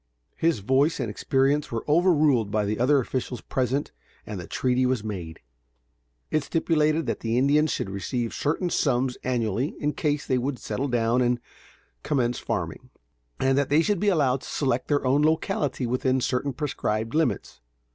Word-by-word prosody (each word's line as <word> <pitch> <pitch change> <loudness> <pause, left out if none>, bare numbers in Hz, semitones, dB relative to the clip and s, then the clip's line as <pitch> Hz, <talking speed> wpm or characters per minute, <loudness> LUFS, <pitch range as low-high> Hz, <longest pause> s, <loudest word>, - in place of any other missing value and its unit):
His 165 -9 +1
voice 135 - +2
and 120 -5 -2
experience 140 +6 +1
were 115 -1 -3
overruled 150 - +3
by 105 0 0
the 105 +2 -2
other 135 +4 +4
officials 125 -1 -3
present 130 +5 -1 0.3
and 105 -3 -6
the 85 - -8
treaty 130 0 +1
was 125 -4 +1
made. 90 -7 -6 0.9
It 155 -1 +1
stipulated 155 0 +1
that - - -2
the 115 +1 -1
Indians 145 +4 +3
should - - -2
receive 115 +4 -3
certain 165 +4 -1
sums 130 -4 +1
annually 120 +1 -1
in 150 0 0
case 145 -1 -1
they 130 -1 +1
would 130 +1 -2
settle 140 +3 -3
down 120 0 +1
and 120 0 +2 0.6
commence 125 - 0
farming, - - -4 0.5
and 135 0 +2
that 140 - 0
they 150 +3 +4
should 205 -1 +1
be 210 - +2
allowed 135 -8 +2
to - - -10
select 130 -3 -1
their 145 -2 +1
own 135 +3 +3
locality 150 -4 0
within 130 +2 +1
certain 125 +2 -1
prescribed 115 -6 -2
limits. 150 - -1
130 Hz, 165 wpm, -25 LUFS, 120-150 Hz, 0.9 s, other